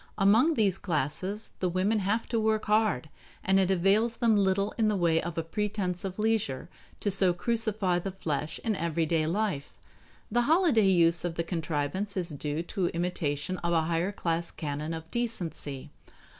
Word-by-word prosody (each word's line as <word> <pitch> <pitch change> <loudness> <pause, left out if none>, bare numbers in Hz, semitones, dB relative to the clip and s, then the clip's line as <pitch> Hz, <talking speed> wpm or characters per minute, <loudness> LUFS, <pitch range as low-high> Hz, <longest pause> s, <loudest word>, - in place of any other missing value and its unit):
Among 225 +11 +4
these 200 -5 +2
classes 185 +4 0
the 180 - 0
women 190 +5 +1
have 205 +4 -1
to 230 - 0
work 220 0 +1
hard, 210 - +1 0.4
and 190 +1 +3
it 190 -1 +2
avails 195 +5 +2
them 230 -2 +3
little 200 0 +1
in 220 -2 +2
the 210 - +1
way 170 -3 +2
of 170 -1 -6
a 165 - 0
pretense 190 0 -2
of 190 -1 -5
leisure 210 -10 -1 0.3
to 205 - 0
so 190 -2 +3
crucify 215 -3 0
the 195 - -4
flesh 155 -5 -4
in 220 -2 0
everyday 165 -2 0
life. 180 -5 -2 0.6
The 240 +3 +3
holiday 315 - +4
use 170 -2 +4
of 175 -2 -3
the 170 - -1
contrivance 165 +4 -2
is 180 -2 0
due 150 +1 -3
to 180 0 -2
imitation 170 -1 -2
of 170 0 -1
a 165 - +3
higher 165 +4 0
class 170 -4 -2
canon 150 +2 -4
of 160 0 -8
decency. 165 - -4
185 Hz, 170 wpm, -28 LUFS, 165-210 Hz, 0.6 s, Among